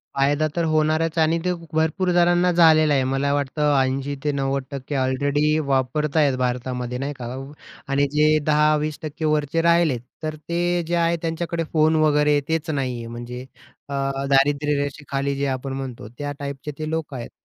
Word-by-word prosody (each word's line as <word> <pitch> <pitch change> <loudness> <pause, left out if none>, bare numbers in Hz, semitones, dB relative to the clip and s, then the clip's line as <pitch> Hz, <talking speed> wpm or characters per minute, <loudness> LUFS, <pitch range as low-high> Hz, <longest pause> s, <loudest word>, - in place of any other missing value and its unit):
फायदा 145 +3 +2
तर 170 - +1
होणारच 155 +1 +1
आणि 160 +1 +3
ते 180 - +2 0.2
भरपूर 160 +4 +1
जणांना 175 +1 +4
झालेला 160 -3 +5
आहे. 135 -2 +2
मला 135 +2 0
वाटतं 145 +1 0
80-90% 135 0 -2
ऑलरेडी 145 +3 +1
वापरत 140 +3 0
आहेत 145 -4 +3
भारतामध्ये, 125 0 -2
नाही 140 +3 -3
का? 120 - -5 0.6
आणि 140 +1 +2
जे 150 +1 +4
10-20% 155 +1 +1
वरचे 150 +1 +1
राहिलेत, 170 -6 +3 0.2
तर 155 0 -3
ते 175 +1 0
जे 175 - 0
आहे 170 0 +2
त्यांच्याकडे, 165 0 -2
फोन 160 0 +3
वगैरे 150 -1 +3
तेच 160 0 -1
नाही 135 -5 -1
आहे. 115 -1 -7
म्हणजे 120 +2 -7 0.4
अ, - - -5 0.4
दारिद्र्यरेषेखाली 140 0 +1
जे 140 +1 -1
आपण 135 0 -3
म्हणतो, 130 -5 -6
त्या 145 0 -4
टाईपचे 140 +1 -5
ते 155 0 -4
लोक 160 -2 -3
आहेत. 120 -3 -6
145 Hz, 150 wpm, -22 LUFS, 135-155 Hz, 0.6 s, झालेला